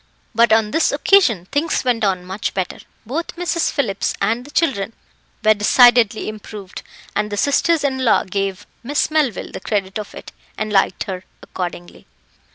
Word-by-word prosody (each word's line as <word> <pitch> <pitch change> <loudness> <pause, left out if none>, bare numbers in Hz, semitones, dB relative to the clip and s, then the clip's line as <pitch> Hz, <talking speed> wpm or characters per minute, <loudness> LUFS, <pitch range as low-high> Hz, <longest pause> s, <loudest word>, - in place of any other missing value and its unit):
But 230 0 +4
on 220 -1 +3
this 320 - +2
occasion 285 - +3
things 305 +3 0
went 240 -3 0
on 185 -3 0
much 190 +3 -4
better; 185 -2 -3 0.3
both 305 +9 -4
Mrs. 345 -1 0
Phillips 200 -8 -1
and 225 +5 0
the - - -12
children 255 -10 0 0.5
were 215 - +7
decidedly 225 +1 +4
improved, 210 -2 -8 0.3
and 210 0 -1
the 205 - -3
sisters 290 +6 +2
in 265 -2 0
law 235 - +4
gave 195 0 -3 0.2
Miss 290 +5 0
Melville 295 - 0
the - - -6
credit 195 0 -2
of 210 - -8
it, - - -10 0.3
and 215 -1 -3
liked 195 - +2
her 185 -1 -6 0.2
accordingly. 175 -1 -7
215 Hz, 165 wpm, -19 LUFS, 195-275 Hz, 0.5 s, were